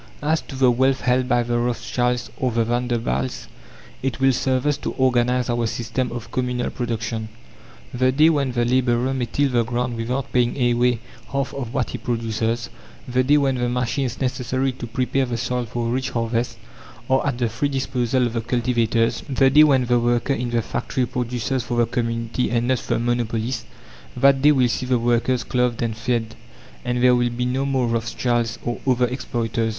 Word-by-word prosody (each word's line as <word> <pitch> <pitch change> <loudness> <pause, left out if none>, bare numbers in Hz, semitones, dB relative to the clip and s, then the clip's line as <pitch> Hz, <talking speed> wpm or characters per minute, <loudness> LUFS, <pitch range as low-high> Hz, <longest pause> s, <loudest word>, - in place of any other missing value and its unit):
As 155 +2 +1
to 135 - -10
the 130 -1 +4
wealth 130 +2 +2
held 125 +1 +2
by 120 -1 +3
the 120 0 0
Rothschilds 120 0 -1
or 130 -1 -1
the 115 0 +1
Vanderbilts, 120 - -1 0.5
it 130 -2 -2
will 135 0 +4
serve 130 +1 0
us 145 -1 +2
to - - -4
organize 125 -1 +2
our 120 -1 0
system 120 +3 -2
of 120 -2 -7
communal 125 -1 -1
production. 115 -2 -3 0.6
The 130 +1 +2
day 155 +5 +5
when 140 -5 0
the 120 -1 +1
labourer 125 +1 +2
may 130 -2 -1
till 140 +4 +1
the 120 -1 +3
ground 120 +1 -2
without 125 +4 -3
paying 120 0 +2 0.2
away 120 -1 +2 0.3
half 140 0 -1
of 135 -3 -5
what 130 -3 0
he - - -5
produces, 115 0 -2 0.4
the 125 +1 +2
day 145 +3 +4
when 140 -2 +2
the 120 0 0
machines 125 +1 -1
necessary 130 0 -1
to 125 -1 -7
prepare 130 +3 0
the 120 -1 -2
soil 125 +1 -2
for 115 +1 -3
rich 130 +2 -1
harvests 115 0 -1 0.5
are 130 0 +2
at 135 - -1
the 120 -1 +1
free 120 +6 -1
disposal 130 -2 0
of 120 - -2
the 115 - -1
cultivators, 115 -1 +1
the 135 0 +3
day 150 +3 +8
when 135 -4 +4
the 120 0 +3
worker 120 +3 +1
in 125 -2 -2
the 120 -1 0
factory 130 +4 -2
produces 125 +2 -2
for 120 0 -3
the 120 - +4
community 115 +1 -2
and 120 0 0
not 130 -1 +2
the - - -1
monopolist 120 0 -1 0.5
that 140 -1 +4
day 150 +2 +6
will 130 -4 +3
see 125 +2 -2
the 125 -1 +3
workers 120 +1 +1
clothed 125 -2 0
and 115 -2 -1
fed, 115 0 -1 0.5
and 125 0 -1
there 125 0 +6
will 120 0 +2
be 120 +1 -2
no 130 +2 0
more 135 -2 +1
Rothschilds 115 0 -1
or 120 - -2
other 125 -1 +3
exploiters. 115 -2 -2
125 Hz, 190 wpm, -22 LUFS, 120-130 Hz, 0.6 s, day